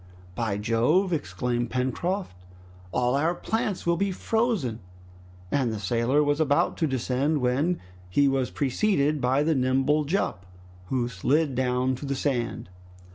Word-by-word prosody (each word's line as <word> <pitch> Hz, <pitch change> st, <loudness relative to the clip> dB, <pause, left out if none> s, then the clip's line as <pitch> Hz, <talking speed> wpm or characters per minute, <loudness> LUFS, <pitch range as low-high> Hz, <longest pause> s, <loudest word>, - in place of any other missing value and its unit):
"By 110 Hz, -1 st, -1 dB
Jove!" 125 Hz, -, +2 dB
exclaimed 120 Hz, -, -2 dB
Pencroft, 130 Hz, -, -2 dB, 0.6 s
"all 125 Hz, 0 st, +1 dB
our 160 Hz, +5 st, +1 dB
plants 215 Hz, -2 st, -2 dB
will 170 Hz, 0 st, +2 dB
be 200 Hz, +2 st, 0 dB
frozen!" 200 Hz, -, 0 dB, 0.7 s
And 130 Hz, -5 st, +1 dB
the 110 Hz, -, -3 dB
sailor 120 Hz, +8 st, +1 dB
was 145 Hz, +1 st, +1 dB
about 155 Hz, +2 st, +2 dB
to 160 Hz, -, +1 dB
descend, 135 Hz, +3 st, 0 dB
when 140 Hz, +8 st, +1 dB, 0.3 s
he 140 Hz, +10 st, +3 dB
was 135 Hz, -2 st, +1 dB
preceded 145 Hz, -, +1 dB
by 130 Hz, +3 st, +2 dB
the 160 Hz, +1 st, +2 dB
nimble 135 Hz, +3 st, +2 dB
Jup, 140 Hz, -, -1 dB, 0.4 s
who 125 Hz, 0 st, 0 dB
slid 135 Hz, -, +1 dB
down 125 Hz, 0 st, +1 dB
to 140 Hz, -, -7 dB
the 140 Hz, -, -1 dB
sand. 125 Hz, -8 st, -2 dB
135 Hz, 140 wpm, -26 LUFS, 125-155 Hz, 0.7 s, he